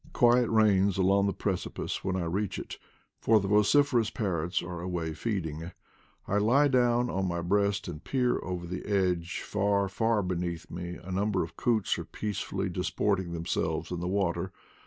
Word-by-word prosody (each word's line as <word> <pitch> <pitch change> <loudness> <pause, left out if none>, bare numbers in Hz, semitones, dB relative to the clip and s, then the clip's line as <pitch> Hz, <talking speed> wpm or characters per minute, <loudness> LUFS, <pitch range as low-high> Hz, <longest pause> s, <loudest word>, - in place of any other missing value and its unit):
Quiet 120 0 +4
reigns 100 -3 +3
along 100 +1 +3
the - - +1
precipice 95 -2 -3
when 95 - -1
I 95 - -1
reach 95 +4 -2
it, - - -7 0.4
for 110 -1 +4
the 100 - -3
vociferous 115 +3 +4
parrots 90 -4 -1
are 85 0 -6
away 85 -3 -3
feeding. 85 -4 -3 0.5
I 100 - +2
lie 135 +8 +4
down 120 -2 +3
on 95 0 -1
my 85 -1 -2
breast 100 +3 +1
and 85 -2 -7
peer 125 -2 +1
over 90 -1 -4
the 90 +1 -5
edge; 90 -4 0
far, 100 -1 +1
far 110 +1 +1
beneath 90 -1 -3
me 90 0 -5
a 95 - -9
number 100 0 +1
of 80 0 -8
coots 110 -2 +1
are - - -5
peacefully 100 -2 -3
disporting 95 +1 -1
them 85 0 -4
selves 85 - -1
in 90 - -2
the 90 - -3
water. 95 -2 0
95 Hz, 175 wpm, -29 LUFS, 90-105 Hz, 0.5 s, Quiet